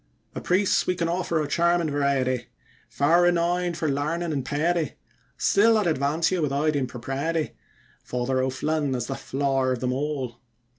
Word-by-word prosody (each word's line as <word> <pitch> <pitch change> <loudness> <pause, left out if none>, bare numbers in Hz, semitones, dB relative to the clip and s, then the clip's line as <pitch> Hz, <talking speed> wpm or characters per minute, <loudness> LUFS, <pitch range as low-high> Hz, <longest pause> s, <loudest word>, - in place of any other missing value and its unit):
Of - - -7
priests 185 +2 +2
we 180 - +1
can 170 -1 -1
offer 170 -1 0
a 150 - -1
charmin' 170 +1 +2
variety, 135 -3 0 0.4
Far 165 +5 +3
renowned 175 0 +1
for 165 -2 -1
larnin' 155 +4 -1
and 135 -3 -2
piety, 155 +4 0 0.4
Still 220 +3 +4
I'd 210 - +1
advance 155 +1 +1
you 185 -2 0
without 150 +1 +1
impropriety, 135 +5 -2 0.5
Father 125 +1 -1
O'Flynn 140 +2 -1
as 120 -1 -2
the 135 - -3
flower 135 -1 0
of 125 - -4
them 125 0 -1
all. 135 -4 -3
150 Hz, 155 wpm, -25 LUFS, 135-170 Hz, 0.5 s, Still